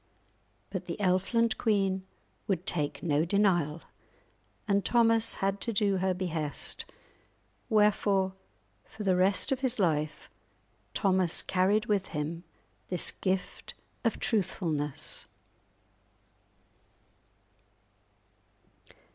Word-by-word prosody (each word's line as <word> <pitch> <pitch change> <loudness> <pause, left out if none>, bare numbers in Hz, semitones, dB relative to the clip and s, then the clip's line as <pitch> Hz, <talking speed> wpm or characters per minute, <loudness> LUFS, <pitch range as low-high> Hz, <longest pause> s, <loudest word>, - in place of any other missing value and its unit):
But - - -5
the - - -4
Elfland 205 +4 +1
queen 195 -4 +1 0.4
would 190 -3 -1
take 150 -6 -2
no 150 -2 +2
denial, 175 -4 +1 0.8
and 200 -1 +2
Thomas 230 +2 +3
had 195 +1 -1
to 235 - +1
do 200 -2 +1
her 190 +1 +1
behest, 165 -5 -2 0.8
wherefore 205 -3 +3 0.5
for 215 - -9
the 190 -2 +3
rest 190 +8 +3
of 265 - +1
his 260 -2 -1
life 155 -6 0 0.7
Thomas 185 -4 +2
carried 195 +4 +2
with 205 -4 0
him 165 +3 -3 0.5
this 180 -2 0
gift 185 -1 -3 0.3
of 230 - 0
truthfulness. 165 - 0
190 Hz, 95 wpm, -29 LUFS, 175-210 Hz, 0.8 s, Thomas